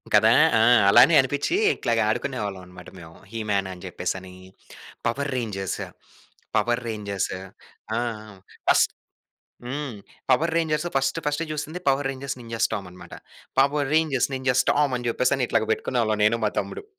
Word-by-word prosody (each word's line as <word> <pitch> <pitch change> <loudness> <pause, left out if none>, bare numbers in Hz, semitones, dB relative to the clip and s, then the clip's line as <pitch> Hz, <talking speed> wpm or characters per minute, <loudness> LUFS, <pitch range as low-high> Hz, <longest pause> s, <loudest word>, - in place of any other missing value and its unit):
కదా! 110 +2 +6 0.3
ఆ! - - +4 0.3
అలానే 125 +10 +7
అనిపిచి 145 - -1 0.2
ఇట్లాగ 115 -1 0
ఆడుకునేవాళ్ళమన్నమాట 100 -7 -4
మేము. 80 -1 -13 0.2
హిమ్యాన్ 105 -4 -1
అని 90 0 -13
చెప్పేసని, 95 +1 -5 0.7
పవర్ 140 +4 -2
రేంజర్స్, 100 -6 -3 0.8
పవర్ 120 0 +1
రేంజర్స్ 100 -3 -3 0.7
ఆ! - - +1 0.7
ఫస్ - - +6 0.8
హ్మ్. 140 0 -4 0.4
Power 160 +6 +3
Rangers 160 0 0
first 135 +3 +1
first 150 +2 0
జూసింది 155 +4 -5
power 135 0 +2
Rangers 135 0 -5
ninjas 115 -1 -1
టామన్నమాట. 90 -3 -8 0.5
Power 140 0 +2
Rangers, 155 -5 +2
ninjas 130 -1 +2
Tom 145 -3 +1
అని 120 0 -3
చెప్పేసి 130 +2 +1
ఇట్లాగ 115 -2 +1
పెట్టుకునేవాళ్ళం 110 -3 0
నేను, 115 +2 +3
మా 105 - +2
తమ్ముడు. 425 - -7
125 Hz, 130 wpm, -24 LUFS, 105-140 Hz, 0.8 s, అలానే